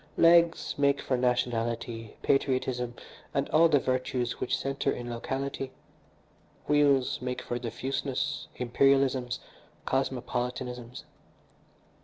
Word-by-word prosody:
Legs 170 0 +5
make 140 -1 +3
for 130 - 0
nationality, 120 -2 -1
patriotism, 130 -3 +1 0.4
and - - +1
all 165 +2 +6
the 145 - +5
virtues 130 -2 -1
which - - 0
centre 135 0 -1
in 120 0 -5
locality. 135 +2 -3 1.0
Wheels 140 -4 +3
make 125 0 -3
for 120 - -3
diffuseness, 130 +3 -3
imperialisms, 130 0 +2 0.5
cosmopolitanisms. 125 -1 -2
130 Hz, 95 wpm, -29 LUFS, 125-135 Hz, 1.0 s, all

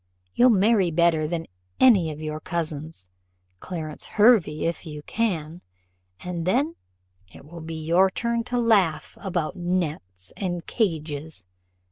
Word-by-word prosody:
You'll 250 +1 +5
marry 205 -3 +4
better 165 -1 +2
than 165 0 -3 0.3
any 200 -11 +5
of 150 - -8
your 155 0 -4
cousins, 155 - -5 0.5
Clarence 160 - -6
Hervey 205 -9 +4
if 165 0 -2
you 150 -3 -8
can; 175 -7 -2 0.6
and 175 -1 -4
then 280 - +1 0.6
it - - -14
will 170 +2 -10
be 160 0 -6
your 180 +4 +4
turn 235 +3 -1
to 245 - -2
laugh 195 -10 +2
about 175 -3 -2
nets 155 - -3
and 175 -4 -3
cages. 160 - -3
170 Hz, 130 wpm, -25 LUFS, 155-195 Hz, 0.6 s, You'll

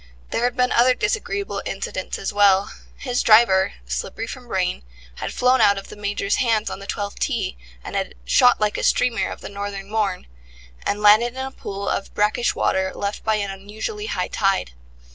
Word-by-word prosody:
There 235 - +1
had 245 0 0
been 250 0 +2
other 250 +2 +4
disagreeable 405 - -2
incidents 185 -1 -4
as 195 - -4
well. 200 -1 +4 0.2
His 250 -2 -1
driver, 215 -4 +5
slippery - - -4
from 250 +1 -9
rain, 185 -4 -1 0.4
had - - -4
flown 255 +1 +3
out 200 0 +5
of 195 - -7
the - - -9
Major's 205 - -1
hands 225 -3 +1
on - - -6
the 200 - -10
twelfth 205 0 -4
tee, - - -1 0.3
and - - -7
had - - -2
"shot 245 - +5
like 210 -1 0
a - - -3
streamer 235 -5 +2
of - - -8
the - - -7
northern 200 0 -6
morn", 205 -4 -1 0.6
and 210 +1 -1
landed 225 +4 +6
in 265 0 -3
a 265 - -6
pool 200 -5 -6
of 195 - -2
brackish 210 +3 +1
water 190 0 +1
left 200 0 -4
by 220 0 +2
an 200 -2 -2
unusually 215 - -6
high - - -1
tide. 195 - 0
210 Hz, 190 wpm, -22 LUFS, 195-245 Hz, 0.6 s, landed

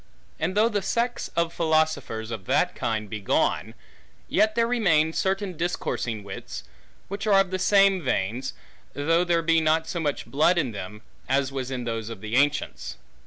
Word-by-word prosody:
And 185 +5 -1
though 220 +2 +5
the 210 -3 -1
sects 235 +5 -1
of 170 0 +1
philosophers 155 -8 0
of 110 -5 -6
that - - +2
kind 110 -2 -2
be 105 +1 -5
gone, 100 - 0 0.5
yet 215 0 +2
there 230 0 +3
remain 170 -10 +2
certain 190 0 -1
discoursing 125 - -2
wits, 100 -1 -7 0.4
which 200 +2 -4
are 200 -2 +6
of 195 -1 +1
the 185 - -1
same 195 0 +4
veins, 125 - -1 0.4
though 165 +4 +2
there 170 -1 +1
be 165 0 +3
not 160 +1 +2
so 170 - -3
much 150 -3 -2
blood 155 +5 +3
in 140 -8 +1
them, 105 +1 -8 0.3
as 135 0 +1
was 130 -2 -4
in 130 -2 -3
those 115 -2 -3
of 115 -3 -7
the 110 +2 -3
ancients. 140 - 0
160 Hz, 175 wpm, -25 LUFS, 120-185 Hz, 0.5 s, are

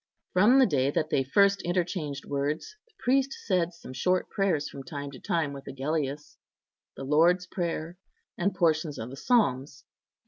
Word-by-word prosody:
From 210 +8 +5
the 265 - +7
day 135 - +1
that 155 +2 -1
they 135 - +2
first 200 +8 +3
interchanged 175 -5 -2
words, 145 - -3
the 475 - -32
priest 270 +2 +1
said 175 - +1
some 165 -6 -11
short 180 +8 0
prayers 175 -7 0
from 140 - -8
time 140 +1 -6
to 130 - -11
time 160 -4 -1
with 140 -1 -10
Agellius—the 140 0 -6
Lord's 170 +6 +3
Prayer, 170 -1 -4 0.4
and 190 +2 -1
portions 160 -4 +1
of 115 +3 -6
the - - -7
Psalms. 140 - +1
160 Hz, 160 wpm, -28 LUFS, 140-185 Hz, 0.4 s, the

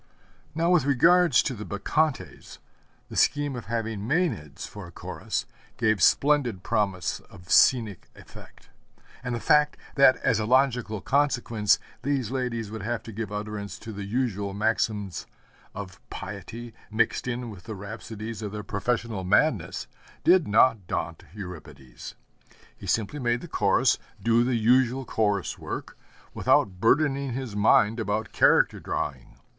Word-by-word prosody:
Now 165 +2 +2
with 175 -6 +4
regard 170 +6 +4
to 130 - +3
the 105 -3 -7
Bacchantes 145 +9 -2 0.5
the - - -9
scheme 145 -2 +2
of 120 - -7
having 115 -2 -3
Mænads 110 - -2
for - - -9
a - - -13
Chorus - - -4 0.3
gave 110 -2 +1
splendid 135 -10 +3
promise 95 -5 -1
of 90 -2 -13
scenic 110 -8 +4
effect; - - -15 0.5
and 125 -1 -2
the - - -3
fact 150 +3 +3 0.2
that, 135 -1 +7
as 115 -5 +2
a 105 - -2
logical 125 -4 +2
consequence, 120 -6 +2 0.2
these 135 -4 -1
ladies 120 -5 -3
would 110 -1 -6
have 120 +3 -3
to 115 - -9
give 110 -1 -5
utterance 105 -1 -5
to 110 -1 -9
the 100 0 -6
usual 100 -3 -2
maxims 105 -2 -1 0.5
of 95 -4 -8
piety, 120 0 -7 0.2
mixed 115 +3 0
in 120 -1 -3
with 95 -4 -12
the 110 -1 -6
rhapsodies 110 +2 -7
of 105 -2 -4
their 105 0 -6
professional 110 0 -2
madness, 105 - +1 0.4
did 180 -1 +5
not 105 -2 +3
daunt - - -4
Euripides. 80 - -10 0.6
He - - -11
simply 115 +7 -1
makes 120 -2 0
the - - -7
Chorus - - +2 0.2
do 115 +1 +3
the 125 0 0
usual 125 +3 +3
chorus 105 -4 -1
work, - - -6 0.4
without 95 -2 +2
burdening 140 +1 +2
his 125 -4 -5
mind 105 +2 +4
about 110 0 -2
character - - +4
drawing. - - -4
115 Hz, 145 wpm, -26 LUFS, 105-130 Hz, 0.6 s, that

